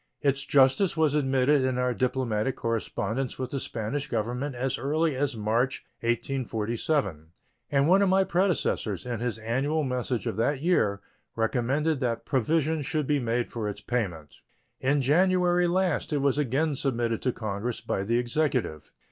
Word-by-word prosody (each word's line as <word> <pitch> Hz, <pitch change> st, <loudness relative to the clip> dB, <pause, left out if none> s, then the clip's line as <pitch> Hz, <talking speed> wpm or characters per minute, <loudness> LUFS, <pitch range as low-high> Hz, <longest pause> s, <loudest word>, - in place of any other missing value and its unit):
Its 135 Hz, -1 st, +2 dB
justice 140 Hz, +7 st, +4 dB
was 155 Hz, -3 st, +3 dB
admitted 135 Hz, -1 st, +3 dB
in 130 Hz, -1 st, 0 dB
our 125 Hz, 0 st, +1 dB
diplomatic 125 Hz, -2 st, 0 dB
correspondence 115 Hz, +2 st, -2 dB
with 130 Hz, -1 st, -4 dB
the 140 Hz, -, -2 dB
Spanish 130 Hz, +5 st, -3 dB
Government 125 Hz, +4 st, -2 dB
as 130 Hz, +2 st, -2 dB
early 155 Hz, +2 st, 0 dB
as 135 Hz, -2 st, -1 dB
March, 115 Hz, +5 st, 0 dB
1847, 120 Hz, -, -1 dB, 0.4 s
and 140 Hz, 0 st, +3 dB
one 190 Hz, +3 st, +5 dB
of 200 Hz, -, +3 dB
my 190 Hz, +1 st, +4 dB
predecessors, 170 Hz, -, 0 dB
in 120 Hz, -3 st, -3 dB
his 120 Hz, -2 st, -2 dB
annual 135 Hz, +8 st, 0 dB
message 125 Hz, -4 st, -2 dB
of -, -, -3 dB
that 130 Hz, +5 st, +1 dB
year, 105 Hz, -, +2 dB, 0.3 s
recommended 130 Hz, +7 st, 0 dB
that 120 Hz, -3 st, -2 dB
provision 155 Hz, +4 st, +1 dB
should 150 Hz, +1 st, -1 dB
be 145 Hz, +1 st, +1 dB
made 120 Hz, -1 st, -1 dB
for 110 Hz, -3 st, -4 dB
its 100 Hz, -, -7 dB
payment. 90 Hz, -, -3 dB, 0.4 s
In 140 Hz, +1 st, +1 dB
January 180 Hz, +4 st, +3 dB
last 180 Hz, -2 st, 0 dB
it 150 Hz, -, +1 dB
was 140 Hz, +1 st, +1 dB
again 145 Hz, +3 st, +1 dB
submitted 120 Hz, -4 st, -1 dB
to 125 Hz, -, +1 dB
Congress 110 Hz, +1 st, -3 dB
by -, -, -2 dB
the 115 Hz, +4 st, +1 dB
Executive. 125 Hz, -, -1 dB
130 Hz, 155 wpm, -27 LUFS, 115-150 Hz, 0.4 s, one